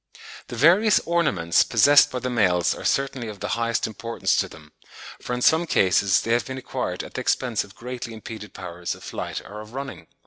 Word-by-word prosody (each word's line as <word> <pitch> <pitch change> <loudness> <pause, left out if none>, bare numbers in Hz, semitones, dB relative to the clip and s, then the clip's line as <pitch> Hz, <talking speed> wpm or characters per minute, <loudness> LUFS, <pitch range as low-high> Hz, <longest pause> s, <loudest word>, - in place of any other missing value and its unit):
The - - -7
various 185 - +5
ornaments 100 - +2
possessed 145 +5 +5
by 130 - -4
the 125 +1 -3
males 90 -7 +2
are - - -9
certainly 135 -3 -1
of 105 -2 -8
the 100 - -4
highest 115 0 0
importance 115 +2 -2
to - - 0
them, 75 -1 -15 0.5
for 125 - -4
in 125 - -3
some 165 +2 +4
cases 95 - +3
they 115 - -3
have 120 -2 0
been 130 0 -5
acquired 130 - -4
at - - -11
the - - -3
expense 120 -4 0
of 100 0 -16
greatly 125 0 -7
impeded 110 -2 -9
powers 90 -2 -5
of - - -15
flight - - -5
or 105 +1 -9
of 110 +3 -12
running. 135 0 -7
115 Hz, 205 wpm, -24 LUFS, 100-130 Hz, 0.5 s, various